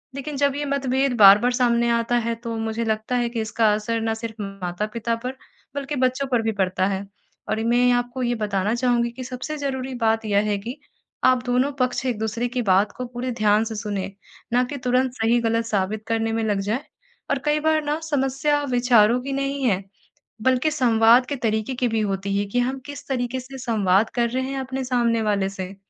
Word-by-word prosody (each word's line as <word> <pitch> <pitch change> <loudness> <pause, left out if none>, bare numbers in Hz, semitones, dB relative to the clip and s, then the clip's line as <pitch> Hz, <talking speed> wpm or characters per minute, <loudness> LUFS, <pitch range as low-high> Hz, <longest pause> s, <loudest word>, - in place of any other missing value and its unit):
लेकिन 280 +1 -5
जब 280 -1 +2
ये 290 - -2
मतभेद 270 -1 0
बार-बार 210 +4 +7
सामने 235 -1 +2
आता 235 +1 +1
है 235 - +1
तो 230 -1 -3
मुझे 225 +1 -2
लगता 220 +3 -1
है 240 -1 +1
कि 230 -2 -3
इसका 215 0 +2
असर 225 +2 -1
ना 225 0 0
सिर्फ़ 225 -1 -6
माता-पिता 205 +4 -3
पर 255 +1 -4 0.4
बल्कि 280 +1 -3
बच्चों 255 +1 0
पर 240 -2 +3
भी 225 - 0
पड़ता 190 -2 0
है। 195 0 -2 0.4
और 215 - 0
मैं 245 +1 +4
आपको 245 +1 -1
ये 240 0 0
बताना 205 -1 -1
चाहूँगी 240 -1 +1
कि 255 +2 -8
सबसे 255 +5 -5
ज़रूरी 265 -2 -3
बात 225 0 +2
यह 205 -1 +2
है 205 - +1
कि 230 +6 -6 0.5
आप 255 -1 +4
दोनों 250 +3 +1
पक्ष 255 +1 0
एक-दूसरे 230 0 -1
की 245 0 -2
बात 200 0 +3
को 250 - -3
पूरे 245 +1 -4
ध्यान 215 -1 +2
से 225 0 -5
सुनें, 205 -2 -3 0.4
ना 245 +1 +4
कि 280 +3 -5
तुरंत 255 0 +1
सही-गलत 230 -1 +1
साबित 210 0 -1
करने 225 0 0
में 225 0 0
लग 205 -2 0
जाए। 215 +8 -2 0.5
और 280 - +1
कई 300 0 +2
बार 315 0 +2
ना 295 +2 -1
समस्या 290 0 0
विचारों 245 -2 +4
की 275 - -3
नहीं 275 0 -2
है 200 -6 +1 0.6
बल्कि 260 +4 +2
संवाद 240 -3 +5
के 285 - -2
तरीके 220 0 -1
की 250 0 0
भी 225 -1 0
होती 195 -1 -1
है 205 - 0
कि 245 - +2
हम 260 +2 -1 0.3
तरीके 250 -1 -1
से 260 +1 -10
संवाद 215 -4 +2
कर 235 -1 +2
रहे 260 +2 -1
हैं 275 - -3
अपने 265 0 -4
सामने 235 -2 +1
वाले 200 -2 +1
से। 190 0 -7
235 Hz, 200 wpm, -23 LUFS, 215-255 Hz, 0.6 s, बार-बार